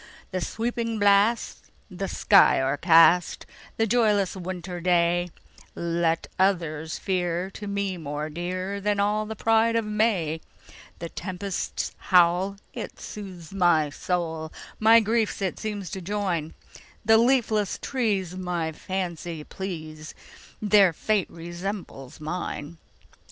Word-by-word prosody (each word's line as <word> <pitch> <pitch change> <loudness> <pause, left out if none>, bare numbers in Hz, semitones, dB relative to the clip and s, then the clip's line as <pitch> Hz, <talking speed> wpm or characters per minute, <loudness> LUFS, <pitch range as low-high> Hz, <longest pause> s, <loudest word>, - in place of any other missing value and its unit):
"The 185 -1 -2
sweeping 230 +2 -2
blast, 205 +3 +2 0.2
the 195 +2 -4
sky 195 -6 +5
o'ercast,"The 165 +9 +3
joyless 210 -4 +2
winter 180 -1 -6
dayLet 170 -1 -1
others 165 -5 0
fear, 180 -1 -1
to 205 +1 -8
me 200 -2 -2
more 150 -1 -4
dearThan 185 +5 -2
all 210 +1 +1
the 220 - -5
pride 225 +1 +3
of 230 -1 +1
May:The 180 -5 -3
tempest's 185 +1 -4
howl, 180 +2 +3 0.2
it - - -7
soothes 185 -5 -9
my 175 -6 +3
soul, 160 -1 -3 0.3
My 225 +1 +7
griefs 220 0 0
it 190 -2 -2
seems 205 -4 -4
to 190 -1 -5
join; 180 -5 -2 0.5
The 220 0 +6
leafless 230 -5 +2
trees 205 -9 -1
my 175 -3 -2
fancy 175 -2 -4
please, 155 -4 -7 0.4
Their 205 -4 +5
fate 210 +3 0
resembles 175 -5 -7
mine! 160 -1 -5
185 Hz, 110 wpm, -25 LUFS, 170-205 Hz, 0.5 s, My